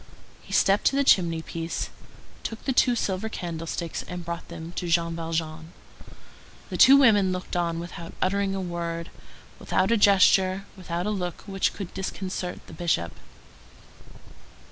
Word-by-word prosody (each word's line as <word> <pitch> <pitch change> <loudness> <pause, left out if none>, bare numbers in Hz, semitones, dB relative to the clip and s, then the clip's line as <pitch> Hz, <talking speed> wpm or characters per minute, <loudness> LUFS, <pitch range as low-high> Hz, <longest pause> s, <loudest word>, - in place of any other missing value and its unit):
He - - -15
stepped 195 +1 +3
to 275 - +4
the 280 - +3
chimney 170 -9 +3
piece, 165 0 -4 0.5
took 225 - -6
the 265 - +1
two 245 -1 +4
silver 200 0 -1
candlesticks, 165 -3 -4
and 180 -1 -6
brought 170 0 -5
them 160 +1 -8
to 175 - -2
Jean 170 0 +1
Valjean. 165 0 -4 1.0
The - - -2
two 275 +1 +9
women 205 -8 +5
looked 185 0 -4
on 170 -1 0
without 170 0 -8
uttering 195 +1 0
a 195 - -2
word, 170 -1 -4 0.5
without - - +1
a 230 - +4
gesture, 195 -1 +4
without 175 -2 -4
a 210 - 0
look 180 -4 -3
which 195 -2 -1
could 195 -4 -7
disconcert 190 -1 -4
the - - -13
Bishop. 125 - -1
180 Hz, 150 wpm, -26 LUFS, 170-195 Hz, 1.0 s, two